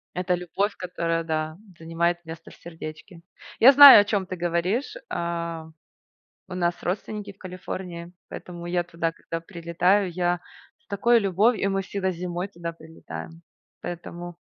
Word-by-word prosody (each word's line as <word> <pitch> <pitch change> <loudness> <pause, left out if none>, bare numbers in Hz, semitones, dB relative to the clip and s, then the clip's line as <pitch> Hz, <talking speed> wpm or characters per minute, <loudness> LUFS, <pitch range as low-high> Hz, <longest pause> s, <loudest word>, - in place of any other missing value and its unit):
Это 180 0 0
любовь, 185 +4 -2
которая, 170 -2 -2
да, 155 0 -2 0.2
занимает 170 +1 -1
место 165 0 -10
в - - -15
сердечке. 165 +1 -10 0.4
Я 255 +4 +10
знаю, 280 -5 +11
о - - +1
чём 205 -2 -1
ты 185 0 -5
говоришь. 180 - -1
А, 170 -1 -3 0.8
у - - -6
нас 175 -1 0
родственники 205 +2 -4
в 195 - -22
Калифорнии, 180 -2 -7 0.2
поэтому 175 -1 -8
я 175 0 0
туда, 165 -1 -2
когда 165 - -6
прилетаю, 175 +2 +1
я 175 0 0 0.4
с - - -40
такой 235 +4 +3
любов 205 +4 +3
и 195 - -1
мы 195 0 0
всегда 190 0 -2
зимой 175 +1 -4
туда 170 -3 -6
прилетаем. 165 0 -10 0.4
Поэтому 175 0 -7
175 Hz, 150 wpm, -25 LUFS, 170-195 Hz, 0.8 s, знаю